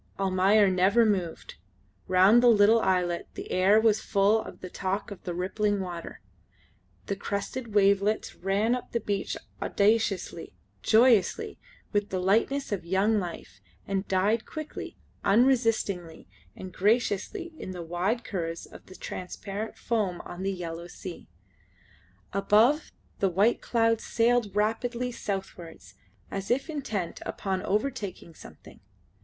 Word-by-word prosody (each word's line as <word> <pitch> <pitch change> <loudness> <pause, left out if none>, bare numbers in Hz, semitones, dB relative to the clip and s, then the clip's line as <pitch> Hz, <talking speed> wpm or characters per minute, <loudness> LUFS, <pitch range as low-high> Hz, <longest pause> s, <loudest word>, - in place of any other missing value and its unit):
Almayer 195 +2 +4
never 190 +5 +4
moved. 185 -6 -2 0.5
Round 190 +6 +6
the 245 - +5
little 220 0 +6
islet 180 -2 0
the - - -7
air 195 +4 +5
was 220 -1 +3
full 205 +2 +2
of - - -11
the 185 - -6
talk 195 +2 -3
of 200 - -8
the 175 - -3
rippling 205 +3 0
water. 175 -3 -6 0.8
The 200 - -2
crested 205 +3 -4
wavelets 200 +1 +3
ran 200 +5 0
up 250 - -5
the 235 - +1
beach 200 -3 -2 0.2
audaciously, 210 -1 0 0.3
joyously, 235 - +3 0.3
with 205 0 0
the 190 - -2
lightness 220 +10 +1
of 195 -4 -2
young 195 +5 +2
life, 165 - -7 0.3
and 195 0 -2
died 205 +4 +1
quickly, 310 -1 -7 0.3
unresistingly, 220 -7 +1 0.3
and 185 -1 -9
graciously, 235 - 0
in - - -6
the 180 -2 -6
wide 180 +8 -1
curves 165 -4 -4
of - - -14 0.2
transparent 200 +4 -6
foam 205 -7 -1
on 175 - -9
the 195 +1 0
yellow 170 -2 -6
sand. 175 0 -9 1.1
Above, 215 +9 +3 0.3
the 195 - +2
white 200 +6 +2
clouds 230 -1 +1
sailed 230 -3 +1
rapidly 235 +4 0
southwards 185 - -6 0.4
as 195 0 -4
if 270 +6 0
intent 220 - -4
upon 190 -2 -3
overtaking 210 -6 -3
something. - - -14
200 Hz, 130 wpm, -27 LUFS, 185-225 Hz, 1.1 s, Round